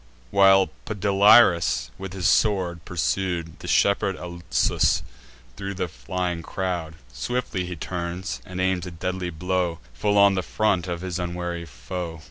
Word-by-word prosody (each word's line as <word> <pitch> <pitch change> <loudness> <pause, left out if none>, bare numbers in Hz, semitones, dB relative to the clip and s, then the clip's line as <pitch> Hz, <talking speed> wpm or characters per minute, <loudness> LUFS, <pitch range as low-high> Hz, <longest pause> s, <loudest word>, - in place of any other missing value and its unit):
While 95 -1 +5
Podalirius, 100 - +4
with 95 -1 -6
his 95 -2 0
sword, 90 -5 +2
pursued 85 -1 -2
The - - -9
shepherd 100 -1 +2
Alsus 85 -1 0 0.5
thro' 100 0 -5
the 90 - -2
flying 90 +1 -3
crowd, 85 -2 -3 0.2
Swiftly 95 - -2
he 90 - -5
turns, 85 -6 -4
and 90 +5 -7
aims 95 -1 0
a - - -4
deadly 90 +1 -3
blow 90 0 -1 0.2
Full 105 +10 +1
on 100 0 +6
the 95 - 0
front 95 -3 0
of 85 -1 -3
his 95 -1 -3
unwary 85 -1 -4
foe. 80 +6 -6
90 Hz, 140 wpm, -24 LUFS, 85-95 Hz, 0.5 s, on